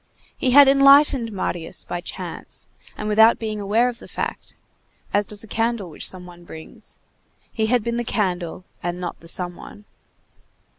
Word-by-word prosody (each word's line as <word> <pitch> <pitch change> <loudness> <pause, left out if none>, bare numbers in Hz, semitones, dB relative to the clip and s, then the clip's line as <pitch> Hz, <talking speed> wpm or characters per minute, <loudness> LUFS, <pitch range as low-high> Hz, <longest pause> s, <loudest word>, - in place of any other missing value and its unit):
He 260 - -1
had 280 +2 +8
enlightened 275 -3 +5
Marius 175 -4 -3
by 175 - -5
chance - - -7 0.3
and 210 - -4
without 220 +2 +5
being 215 -2 -4
aware 215 +4 +2
of 245 -1 -5
the - - -12
fact, - - -5 0.6
as 205 0 +1
does 210 0 -6
a - - -12
candle 225 -4 -2
which - - -2
some 185 -1 -10
one 175 -1 -13
brings; 160 -2 -11 0.5
he 220 -1 -1
had 245 -1 +2
been 235 +1 -2
the 240 - -1
candle 180 -6 -2 0.2
and 175 0 -3
not 175 -1 -5
the 165 - -15
some 175 +1 -3
one. 205 +3 -13
210 Hz, 170 wpm, -22 LUFS, 180-235 Hz, 0.6 s, had